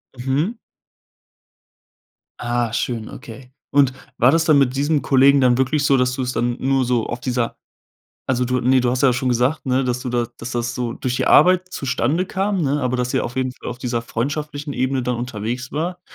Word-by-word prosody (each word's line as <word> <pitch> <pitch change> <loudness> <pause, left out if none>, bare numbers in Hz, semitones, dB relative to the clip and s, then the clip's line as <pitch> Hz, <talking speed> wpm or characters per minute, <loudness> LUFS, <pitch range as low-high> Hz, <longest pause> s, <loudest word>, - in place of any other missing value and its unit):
Mhm. 135 - -1 1.8
Ah, 120 -1 -1
schön, 115 -2 -3
okay. 125 +2 -11 0.2
Und 140 -2 +4 0.3
war 120 - +6
das 165 +2 +2
dann 150 -4 +5
mit 130 -1 +2
diesem 145 +2 +1
Kollegen 135 +1 +4
dann 125 -2 +4
wirklich 140 +3 +1
so, 135 -2 +4
dass 125 0 +1
du 130 - -3
es 125 0 -2
dann 120 0 0
nur 135 -1 +1
so 120 -2 0
auf 120 - -4
dieser 120 -1 -2 0.7
also, 125 -1 +1
du 125 0 0
ne, 130 +1 +3
du 120 0 +1
hast 130 +2 -1
ja 130 -2 +5
schon 125 +1 -1
gesagt, 125 +6 0
ne, 130 0 +1
dass 125 0 -1
du 125 - -4
da 120 -1 0
dass, 115 +1 -6
das 120 0 -2
so 120 -2 -2
durch 125 +1 -3
die - - -1
Arbeit 185 +3 +5
zustande 140 +6 -1
kam, 195 0 -1
ne, 145 0 0
aber 125 -1 -1
dass 125 0 -1
sie 130 - +1
auf 120 +2 -5
jeden 130 -1 -1
Fall - - -8
auf 120 - -6
dieser 120 -2 -2
freundschaftlichen 145 +5 -4
Ebene 130 +1 0
dann 125 0 -1
unterwegs 120 +1 -4
war. 175 +4 -3
130 Hz, 210 wpm, -20 LUFS, 120-140 Hz, 1.8 s, war